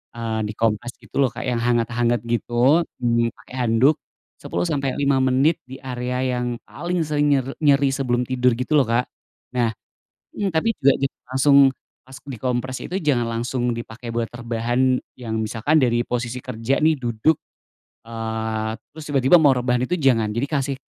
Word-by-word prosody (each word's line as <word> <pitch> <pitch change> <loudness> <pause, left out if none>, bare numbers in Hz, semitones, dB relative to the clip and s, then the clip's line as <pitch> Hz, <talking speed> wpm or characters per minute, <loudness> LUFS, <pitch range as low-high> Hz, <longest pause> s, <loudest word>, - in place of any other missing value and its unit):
eee, 115 -1 -3
dikompres 115 +2 -1
gitu - - -18
loh, 130 - +2
Kak, - - -6
yang 120 -2 0
hangat-hangat 120 -1 +1
gitu, 120 +7 +2 0.2
mmm, 115 -1 +1
pakai 125 - -14
handuk 130 +7 +4 0.4
10 175 - -3
sampai 140 -4 -1
5 140 -1 +3
menit 130 +5 +3
di 130 +1 -10
area 125 0 -3 0.2
yang 120 -1 -3
paling 175 0 -3
sering 150 -2 +1
nyer 135 -2 +1 0.2
nyeri, 140 -1 +4
sebelum 125 -3 0
tidur 125 -1 +2
gitu 125 +6 0
loh, 135 - +4
Kak. 120 +2 0 0.5
Nah 115 -2 +1 0.7
mmm, 195 -3 -1
tapi 160 +8 +2
juga 140 -1 +5
jangan 135 - -3
langsung 140 +1 +5 0.5
pas 130 - -13
dikompres 130 +1 -2
itu, - - -6
jangan 130 -6 +1
langsung 120 0 -1
dipake 115 0 -7
buat 115 -1 -1
rebahan, 120 +2 0 0.2
yang 110 -3 -3
misalkan 115 +8 +1
dari 120 -1 +2
posisi 120 0 -3
kerja 125 +2 -1
nih, 160 0 +5
duduk, 120 +6 +2 0.7
eee, 110 -1 -3 0.2
terus 155 0 -9
tiba-tiba 135 +4 +5
mau 145 -3 +6
rebahan, 125 0 0
itu 180 - -3
jangan, 120 -7 +2
jadi 125 +5 -1
kasih 140 -2 -1
125 Hz, 165 wpm, -22 LUFS, 115-140 Hz, 0.7 s, mau